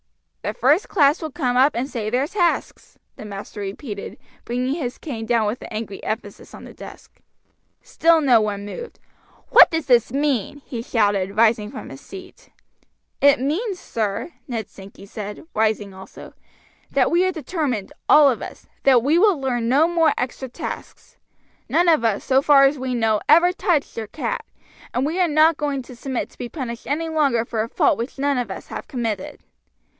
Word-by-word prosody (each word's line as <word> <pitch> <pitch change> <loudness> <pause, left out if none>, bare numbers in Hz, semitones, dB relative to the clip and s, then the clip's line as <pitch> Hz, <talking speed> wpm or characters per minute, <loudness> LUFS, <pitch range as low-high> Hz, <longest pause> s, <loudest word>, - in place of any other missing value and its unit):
"The 210 - -4
first 290 - +2
class 295 -3 +3
will 315 - -4
come 255 -5 -1
up 270 +4 +4
and 245 +3 -1
say 225 -6 -4
their 250 +4 +1
tasks," 345 +1 -2 0.2
the - - -9
master 205 0 -8
repeated, 200 +1 -6 0.3
bringing 250 +3 -2
his 265 -6 -4
cane 225 -7 -6
down 230 -2 +2
with 215 +5 -3
angry 215 -3 -6
emphasis 220 - -6
on - - -12
the - - -11
desk. - - -13 0.6
Still 330 0 +3
no 255 -7 +4
one 205 -1 -3
moved. 470 - -8 0.5
"What - - +8
does 320 -2 -2
this 240 -4 +3
mean?" 280 -1 -1
he 235 -3 -5
shouted, 205 -4 0
rising 220 -2 +3
from - - -9
his 135 - -11
seat. 370 -1 -12 0.7
"It 285 -2 +5
means, 360 - -2
sir," 220 - -3
Ned 230 -5 -4
Sankey 195 0 -13
said, 205 +3 -7
rising 215 -2 0
also, 190 0 -12 0.6
"that 265 -3 +2
we 345 +2 +3
are 370 - +1
determined, 300 - -3 0.2
all 300 -1 +8
of 255 -4 +1
us, - - -9 0.2
that 255 -4 +4
we 305 +6 +3
will 395 -5 +4
learn 245 -3 -1
no 290 +6 +4
more 335 -2 +2
extra 260 +1 -4
tasks. - - -8 0.5
None 345 +2 +2
of 320 -7 +4
us, 220 -3 0
so 265 0 +3
far 280 -1 +6
as 275 +1 +3
we 255 -1 -2
know, 220 -2 +1
ever 340 +4 +6
touched 355 -6 0
your 225 -2 -5
cat, - - -4 0.5
and 255 - +1
we 325 +5 -2
are 355 - +4
not 310 +1 +4
going 285 -3 -2
to 245 - -12
submit 260 +1 -4
to - - -22
be 245 - -5
punished 240 -6 -6
any 315 +4 -1
longer 280 -8 +1
for 225 -2 -2
a 225 - -3
fault - - +2
which 240 +5 -5
none 280 -1 +1
of 240 -4 -3
us 190 - -7
have - - -7
committed." 225 -6 -4
255 Hz, 185 wpm, -22 LUFS, 220-300 Hz, 0.7 s, What